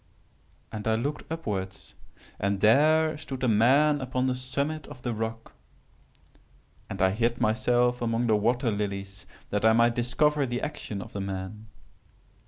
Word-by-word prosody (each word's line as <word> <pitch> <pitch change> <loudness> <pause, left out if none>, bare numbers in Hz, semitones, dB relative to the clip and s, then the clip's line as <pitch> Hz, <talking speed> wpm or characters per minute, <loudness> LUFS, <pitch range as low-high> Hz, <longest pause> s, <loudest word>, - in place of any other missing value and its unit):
"And 110 0 -5
I 110 - +3
looked 145 +7 -4
upwards, 100 -12 -4 0.5
and 100 0 0
there 155 +8 +4
stood 130 -3 -6
a - - +3
man 135 +7 +4
upon 130 0 -1
the 130 - +1
summit 140 +5 -3
of 125 - -12
the 120 - -1
rock; 115 +1 -5 1.4
and - - -6
I 95 - +4
hid 115 +3 0
myself 120 +2 +2
among 115 0 0
the 110 -2 +3
water 120 +3 +1
lilies 100 -1 -4 0.2
that 105 0 -1
I 110 0 +6
might 115 +1 +4
discover 140 +4 +1
the 120 0 -3
actions 105 -9 -5
of - - -14
the 100 - -3
man. 95 +3 -6
120 Hz, 155 wpm, -27 LUFS, 105-130 Hz, 1.4 s, I